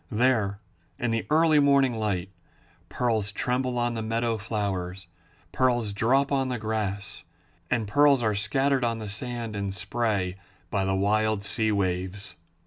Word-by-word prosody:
There 110 -4 +1 0.4
in 120 -1 -1
the 115 0 -1
early 155 0 +5
morning 140 -3 +4
light, 100 -4 -2 0.6
pearls 110 -5 0
tremble 125 +3 -1
on 120 0 0
the 115 - -3
meadow 115 +1 0
flowers, 95 -3 -3 0.5
pearls 120 -5 +1
drop 135 +7 +2
on 135 -2 +1
the 125 -1 -2
grass, 105 -2 -3 0.5
and 115 -3 0
pearls 140 +2 +4
are 110 -1 +2
scattered 130 +6 +1
on 115 -1 0
the 110 -1 -6
sand 115 +1 -4
in 100 -1 -2
spray 100 -1 -1 0.3
by 95 -1 0
the 95 0 +1
wild 105 +1 +1
sea 110 +1 +1
waves. 95 0 -2
110 Hz, 145 wpm, -26 LUFS, 100-125 Hz, 0.6 s, early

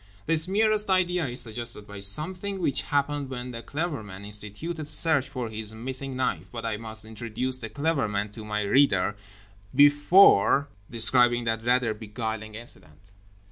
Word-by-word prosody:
This 165 +1 +3
merest 215 +1 +2
idea 180 -3 +1
is 125 +1 -5
suggested 115 -2 -5
by 100 -1 -10
something 180 - 0
which 170 -7 -1
happened 145 -1 -1
when 125 -1 -6
The 115 -1 -7
Clever 150 +1 -4
Man 100 -1 -10
instituted 105 +11 0
a - - -4
search 150 -1 +3
for 125 -3 -4
his 110 0 -6
missing 130 +3 -2
knife—but 125 -2 -3
I 110 -2 -2
must 110 0 -5
introduce 115 +4 -4
The 115 -3 -6
Clever 145 -2 -1
Man 105 0 -3
to 110 +1 -9
my 105 0 -3
reader 105 -3 +2 0.6
before 145 - +5 0.2
describing 120 +1 +4
that 115 -1 -2
rather 120 -1 +2
beguiling 110 0 -5
incident. 95 -5 -10
120 Hz, 155 wpm, -26 LUFS, 110-145 Hz, 0.6 s, before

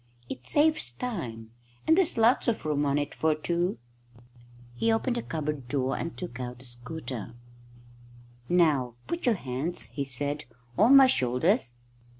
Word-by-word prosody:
"It 125 0 -6
saves 295 - +2
time, 120 - -5 0.3
and 320 - +5
there's 355 -7 +2
lots 230 +4 +4
of 230 -8 0
room 145 -1 +1
on 140 +1 +2
it 145 0 -2
for 155 -1 +1
two." 170 -1 -1 1.0
He 225 - +1
opened 235 +2 +1
the - - -1
cupboard 150 - -4
door 135 0 0
and 165 - -5
took 150 -9 -6
out 125 0 -6
a - - -7
scooter. 120 -1 -7 1.1
"Now 150 -9 +3
put 340 -5 -3
your 235 - +4
hands," 145 +3 -3
he 140 - -2
said, 145 +3 -2 0.3
"on 230 +8 +6
my 270 -1 +10
shoulders." 130 - +1
150 Hz, 155 wpm, -28 LUFS, -, 1.1 s, my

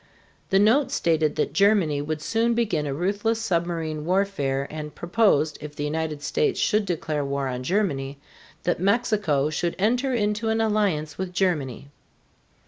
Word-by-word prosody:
The 195 - +3
note 225 +8 +4
stated 160 -3 +1
that - - -1
Germany 195 -8 +3
would 150 +1 -4
soon 230 +4 +1
begin 200 -11 0
a 140 - -2
ruthless 205 +7 0
submarine 170 -6 -2
warfare 170 -7 0
and 150 -1 -7
proposed, 170 -6 +2
if 150 -1 -8
the 145 - -4
United 155 0 -3
States 425 - 0
should 215 -1 +2
declare 155 -4 -2
war 140 0 -2
on 125 -1 -3
Germany, 140 -5 -1 0.5
that 175 - 0
Mexico 200 - +1
should 170 +2 -1
enter 245 +7 +1
into 210 -1 0
an 220 0 +1
alliance 200 -9 0
with 185 -1 -3
Germany. 145 - -1
175 Hz, 150 wpm, -24 LUFS, 150-210 Hz, 0.5 s, note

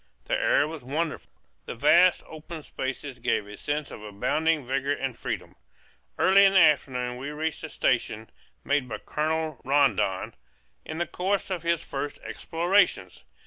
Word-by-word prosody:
The - - -3
air 145 - +3
was 155 -4 -8
wonderful; 155 +5 -3 0.4
the - - -5
vast 170 +8 +5
open 155 0 -9
spaces 130 -1 -5
gave 120 -4 0
a 105 0 -10
sense 145 +5 -3
of - - -9
abounding 150 +9 0
vigor 135 +2 0
and 135 -3 -3
freedom. - - -5 0.6
Early 195 +1 +6
in 195 0 +5
the 190 - +6
afternoon 130 -6 +2
we 135 +3 -5
reached 155 +2 -3
a 160 - -5
station 110 -5 -1 0.3
made 140 -3 0
by 110 - -4
Colonel 155 +3 -2
Rondon 135 -9 +1 0.5
in 160 - -6
the 175 - 0
course 195 +3 -2
of 180 -3 -2
his 170 0 0
first 140 +1 -5
explorations. 175 - 0
150 Hz, 155 wpm, -26 LUFS, 130-165 Hz, 0.6 s, Early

